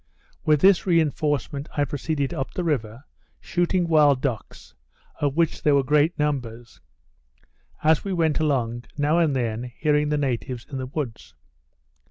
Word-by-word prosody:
With 150 -2 +3
this 195 -1 +5
reinforcement 150 -4 0
I 145 - +2
proceeded 145 0 -2
up 135 -5 -4
the 180 - -2
river, 125 -6 -2 0.4
shooting 175 0 0
wild 150 -4 +4
ducks, 125 -7 -5 0.5
of 145 0 -1
which 165 -2 +1
there 145 -1 +3
were 140 - +3
great 150 +5 +2
numbers; 120 -6 -3 1.0
as 155 0 +3
we 200 - -4
went 165 -4 +1
along, 120 -6 -1
now 150 +3 +2
and 155 -5 +2
then 120 0 -2
hearing 150 -1 +1
the 150 - +1
natives 125 -3 -3
in 135 -3 -6
the 130 - -4
woods. 130 -5 -6
145 Hz, 150 wpm, -24 LUFS, 130-155 Hz, 1.0 s, this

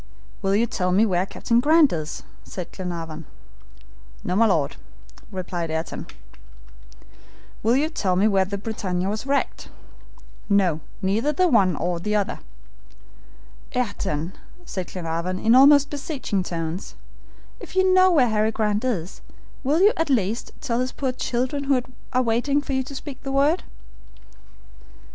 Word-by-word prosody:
"Will 195 +1 +1
you 225 +3 +3
tell 185 -5 -1
me 200 +5 +4
where 185 -2 +1
Captain 235 +3 +1
Grant 305 - +5
is?" 155 -2 -4 0.2
asked 180 -3 -6
Glenarvan. 165 -4 -6 1.0
"No, 180 - -1
my 225 +3 +5
Lord," 155 -8 +1 0.5
replied 175 -3 -4
Ayrton. 160 +1 -4 1.5
"Will 230 +3 +3
you 290 +4 +2
tell 200 - -1
me 195 +4 +4
where 195 -3 +3
the 200 +1 -4
BRITANNIA 190 -4 -2
was 215 +6 -3
wrecked?" 280 0 -1 0.8
"No, 190 -6 +3 0.2
neither 215 +10 +1
the 365 +5 +2
one 200 - +4
nor 175 +2 -2
the 210 +4 -1
other." 205 -2 0 1.4
"Ayrton," 190 -8 -2 0.3
said 185 - -4
Glenarvan, 170 +1 -3
in 225 +4 +3
almost 285 +2 +7
beseeching 275 - -2
tones, 170 0 -4 0.6
"if - - -11
you 375 0 +4
know 370 0 +6
where 280 -9 +4
Harry 215 0 +2
Grant 210 0 0
is, 195 -9 -3 0.4
will 295 +6 +2
you, 415 +4 +6
at 325 -2 0
least, 225 -3 0
tell 245 -6 -1
his 255 +1 -1
poor 265 -2 -2
children, 255 +2 -2
who 275 -2 +3 0.3
are 255 0 +2
waiting 245 +5 +1
for 285 -1 -4
you 265 - +1
to 275 +2 -8
speak 270 -1 -8
the 270 - -5
word?" 285 +6 +3
215 Hz, 150 wpm, -24 LUFS, 185-275 Hz, 1.5 s, almost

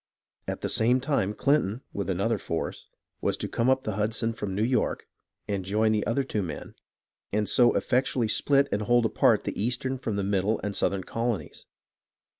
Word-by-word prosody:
At - - -4
the - - -1
same 125 +3 +3
time 125 -7 0
Clinton 135 -5 +1
with 100 -1 -3
another 100 +4 0
force 85 -2 -4 0.3
was - - 0
to - - -3
come 115 +2 0
up 130 0 +3
the 110 -2 -3
Hudson 115 +2 0
from 105 -4 -4
New 105 - +1
York 125 +2 0 0.4
and 100 -2 -2
join 110 +4 +2
the 105 -1 +1
other 120 +5 +1
two 110 -5 -2
men 85 -5 -6 0.6
and 105 0 0
so 120 -1 +4
effectually 125 -2 +1
split 140 +5 +3
and 105 - 0
hold 120 +2 +3
apart - - +3
the - - -3
eastern 130 +2 -1
from 110 -4 -3
the 100 - -1
middle 100 +2 +1
and 105 -1 -2
southern 95 -1 0
colonies. 115 0 -3
110 Hz, 185 wpm, -27 LUFS, 100-125 Hz, 0.6 s, so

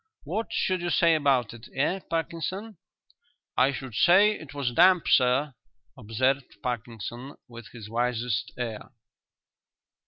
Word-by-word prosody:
What 225 - -3
should 185 -2 0
you 175 - -2
say 170 -1 +4
about 135 -7 +2
it, 115 +1 -13
eh, 145 +8 +1
Parkinson?" 180 +5 -4 0.8
"I 130 +2 +4
should 130 -2 -7
say 185 - +5
it 155 -9 -8
was 140 -4 -2
damp, 180 +5 +5
sir," 130 +3 +3 0.4
observed 130 +3 -1
Parkinson, 120 +2 -5
with 120 -2 -11
his 110 -2 -11
wisest 120 -1 -1
air. 115 -4 -5
130 Hz, 125 wpm, -27 LUFS, 120-170 Hz, 0.8 s, say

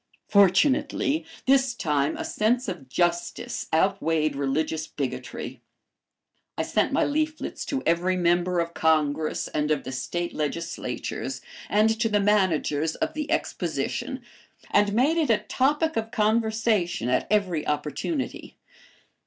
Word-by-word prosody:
Fortunately, 260 - +3 0.2
this 265 -2 +3
time 150 -6 0
a - - -4
sense 240 +4 +1
of 175 -9 -6
justice 175 +4 -1
outweighed 160 -3 +1
religious 150 +3 -1
bigotry. - - -5 1.0
I - - 0
sent - - +1
my - - +2
leaflets 310 +1 -2
to 270 -1 -2
every 175 +3 +2
member 175 0 +2
of 170 0 -2
Congress 155 -1 +1
and 150 0 -1
of 155 - +1
the 130 - -6
State 170 +7 -3
legislatures, 155 +2 -3 0.3
and 220 +1 +3
to 225 0 +2
the 210 -1 +2
managers 170 -7 +1
of - - -2
the 300 -1 -4
Exposition, - - -2 0.5
and 205 0 +4
made 275 +9 +3
it 315 -5 +1
a 225 - +5
topic 295 +5 +1
of 225 0 -1
conversation 220 - +1
at 125 0 +1
every 185 -7 +1
opportunity. 150 - -3
185 Hz, 130 wpm, -26 LUFS, 160-225 Hz, 1.0 s, a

